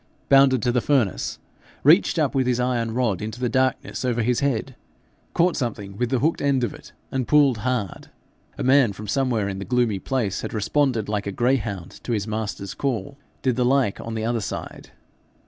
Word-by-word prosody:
bounded 135 -4 +5
to 120 - +2
the 120 0 +1
furnace, 125 -9 0 0.5
reached - - +5
up - - +1
with 130 -2 +1
his 125 -1 +1
iron 120 -2 0
rod 110 -5 0
into 110 +3 -5
the 125 - 0
darkness 130 +2 0
over 120 -2 0
his 120 +1 +1
head, 135 -2 -1 0.6
caught 175 +1 +3
something 105 -6 -4
with 125 +3 -1
the 130 - +1
hooked 155 +7 0
end 140 -3 +2
of 120 - -1
it, - - -13 0.2
and 130 -2 -2
pulled 140 -6 +4
hard. 115 -4 -3 0.5
A - - -3
man 130 -2 +5
who - - -6
from 105 +2 -9
somewhere 115 -2 0
in 95 -1 -4
the - - -4
gloomy 120 -4 +1
place 115 -4 -2
had - - -5
responded 115 0 +1
like 105 -1 -2
a - - -1
greyhound 105 -6 -1
to 120 - -2
his 105 -2 -1
master's 105 -3 -4
call, 130 0 -3 0.3
did 130 -2 +2
the 125 - +2
like 130 -4 +2
on 115 0 -5
the 110 0 -2
other 115 -1 0
side. - - -6
120 Hz, 200 wpm, -23 LUFS, 105-130 Hz, 0.6 s, bounded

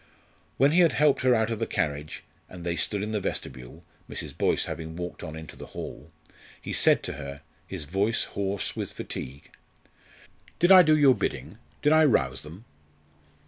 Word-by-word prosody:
When 140 +2 +4
he 170 - +4
had 170 -2 +5
helped 150 -1 +3
her 130 -1 +4
out 110 0 +1
of 115 - -3
the 115 - -1
carriage, 75 0 -3 0.3
and 90 -2 -10
they 85 -1 -1
stood 100 +3 -1
in 105 - -3
the 105 - 0
vestibule 65 -9 -6 0.3
Mrs. - - -6
Boyce - - +1
having 80 0 -6
walked 90 0 -6
on 80 - -7
into 80 0 -9
the - - -10
hall - - -7 0.5
he - - -6
said - - +4
to - - -3
her, 70 0 -8 0.3
his - - -6
voice 100 +8 +1
hoarse 100 -1 -3
with - - -4
fatigue: 70 +2 -7 1.1
"Did 175 +2 +4
I 185 -1 +11
do 155 -2 +4
your 140 -3 +6
bidding, - - -4 0.2
did 150 - +5
I 155 0 +6
rouse 65 - +2
them?" 85 +10 -12
100 Hz, 185 wpm, -27 LUFS, -, 1.1 s, I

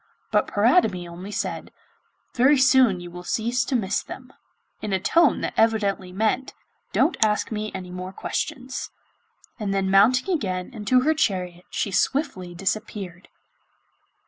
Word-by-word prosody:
But - - +2
Paridamie 210 - +2
only 175 +3 -9
said: - - -4 0.6
'Very 265 +4 +4
soon 260 -7 +5
you 175 0 -9
will 180 +1 -8
cease 235 +6 0
to 260 - -1
miss 205 -4 0
them!' 260 0 -11 0.5
in 210 - -3
a 190 - +2
tone 330 - +3
that - - -2
evidently 205 -4 +1
meant 220 +7 -1 0.4
'Don't - - +2
ask 210 +1 0
me 215 0 -3
any 180 -1 -6
more 180 +1 -6
questions.' 255 +6 -4 0.7
And 200 -2 -2
then 190 -1 0
mounting 250 - +4
again 185 - -3
into 245 +3 +2
her 310 +5 +3
chariot 180 - -1
she 200 - -2
swiftly 190 - -1
disappeared. 195 -1 -4
210 Hz, 145 wpm, -24 LUFS, 185-255 Hz, 0.7 s, soon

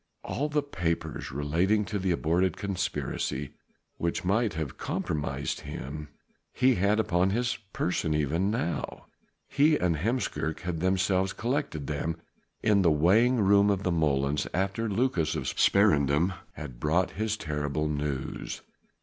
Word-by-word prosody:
All 145 +3 -2
the 150 -1 +1
papers 85 - -3
relating 85 +10 +1
to 100 +2 -3
the 95 0 -1
aborted 85 +1 +1
conspiracy 90 -8 -2 0.5
which 85 +1 -2
might 105 0 +1
have 80 -5 -4
compromised 75 -2 -2
him 75 +2 -6 0.4
he 130 +1 +3
had 100 +2 +2
upon 90 -3 +2
his 120 +4 0
person 80 -3 0
even 80 +6 +1
now. 105 -6 -3 0.4
He 150 +2 +4
and 85 -3 +1
Heemskerk 95 - -1
had 85 -2 -3
themselves 95 +1 +1
collected 120 - -2
them 75 +3 -2 0.5
in 105 -2 +4
the 85 - +4
weighing 105 +11 +4
room 100 +1 +5
of 100 -1 0
the 90 - +1
molens 75 -3 +1
after 95 +4 0
Lucas 95 -8 +1
of - - -2
Sparendam 80 -3 +3 0.2
had 70 -5 -8
brought 85 +6 +1
his 110 0 -2
terrible 75 -1 -2
news. 75 -3 -3
90 Hz, 135 wpm, -28 LUFS, 75-105 Hz, 0.5 s, room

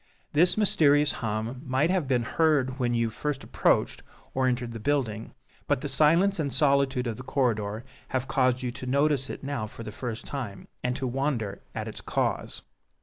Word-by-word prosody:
This 175 +7 +4
mysterious 150 -8 +4
hum 110 +3 -3
might 140 +4 +1
have 185 -7 0
been 125 -3 +2
heard 140 -2 +1
when 120 -1 +1
you 115 -1 +1
first 145 +3 -3
approached - - +1 0.3
or 130 0 +2
entered 125 -1 -1
the 115 - -6
building; 115 -4 -1 0.3
but - - +1
the 145 - -3
silence 165 +7 +4
and 145 -3 -1
solitude 135 -1 +2
of 115 -2 -3
the 130 - -7
corridor 115 -5 -1 0.2
have 130 0 -2
caused 130 0 +2
you 125 - -1
to 125 +1 -8
notice 140 0 +2
it - - -7
now 135 -6 -3
for 115 - -10
the 110 - -6
first 115 0 -5
time, 120 -9 -6 0.2
and 125 0 0
to 130 - -3
wonder 125 -6 -2
at - - -3
its - - -7
cause. - - -2
130 Hz, 185 wpm, -27 LUFS, 120-145 Hz, 0.3 s, This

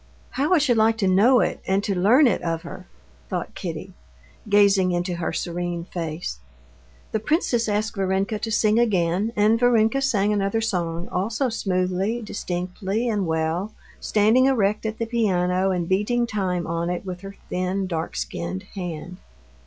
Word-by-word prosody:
How 285 +5 -1
I - - +5
should 270 -6 +2
like 220 +1 +3
to 200 -3 +1
know 220 +7 +5
it - - -1
and 195 +1 +1
to 200 - 0
learn 215 +11 +5
it 240 - +2
of 165 -1 -2
her!" 170 - -9 0.4
thought - - -4
Kitty, - - -6 0.6
gazing 200 -2 +4
into 175 0 -1
her 170 - -2
serene 175 -1 -3
face. 160 - -5 0.7
The 220 - 0
princess 240 - 0
asked 215 +2 -1
Varenka 195 +2 0
to 225 - -3
sing 215 0 +3
again, 195 -2 +1
and 215 +2 +3
Varenka 245 +1 +3
sang 210 -6 +2
another 200 +2 0
song, 175 -6 -2
also 220 +8 -1
smoothly, 190 +1 -1
distinctly, 190 +3 -3
and 205 -5 0
well, 160 +5 -1 0.2
standing 220 +5 +3
erect 215 -4 +1
at 220 0 -4
the 230 - -2
piano 190 -5 +1
and 180 -3 -1
beating 210 +6 +1
time 185 -6 -2
on 170 +1 -2
it 180 +2 -3
with 180 -1 -6
her 195 0 -9 0.2
thin, 185 +2 -1
dark 165 -3 -4
skinned 85 +2 -4
hand. 180 -1 -6
195 Hz, 160 wpm, -23 LUFS, 180-220 Hz, 0.7 s, I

